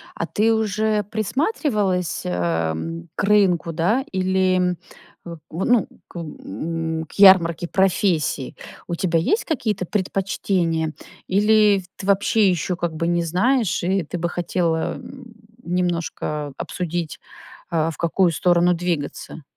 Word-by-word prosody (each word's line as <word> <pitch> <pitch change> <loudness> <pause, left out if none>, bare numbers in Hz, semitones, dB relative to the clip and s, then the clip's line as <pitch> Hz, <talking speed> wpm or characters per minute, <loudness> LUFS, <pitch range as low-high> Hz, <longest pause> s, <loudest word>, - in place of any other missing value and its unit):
А - - -2
ты 225 +2 +2
уже 215 0 0
присматривалась, 210 - -1
эм, 85 - -2
к - - -1
рынку, 190 -5 +3
да, 205 +12 +1
или, 185 0 +2
м, 180 -1 +1 0.5
в 170 -2 -8 0.2
ну, 240 -5 +3 0.2
к - - -14
м, 160 - -4
к - - -19
ярмарке 175 -4 +6
профессий? 185 -8 +1 0.3
У 170 - -2
тебя 170 -1 +1
есть 420 - +1
какие-то 215 - -2
предпочтения 180 -5 -1 0.3
или 210 +1 +4
в - - -13
тв 180 - -19
ты 190 - -7
вообще 200 +1 +3
ещё 180 +1 -1
как 170 -2 -3
бы 165 - -1
не 175 0 +1
знаешь 195 +7 +1
и 190 +1 +1
ты 170 +3 -5
бы 170 - -1
хотела, 170 -2 -1
м, 260 -3 -11 0.3
немножко 170 -4 -2
обсудить, 175 -3 -4 0.5
а, 165 -1 +1
в - - -9
какую 170 +1 +2
сторону 175 +1 +3
двигаться? 165 -2 -4
180 Hz, 135 wpm, -22 LUFS, 165-200 Hz, 0.5 s, ярмарке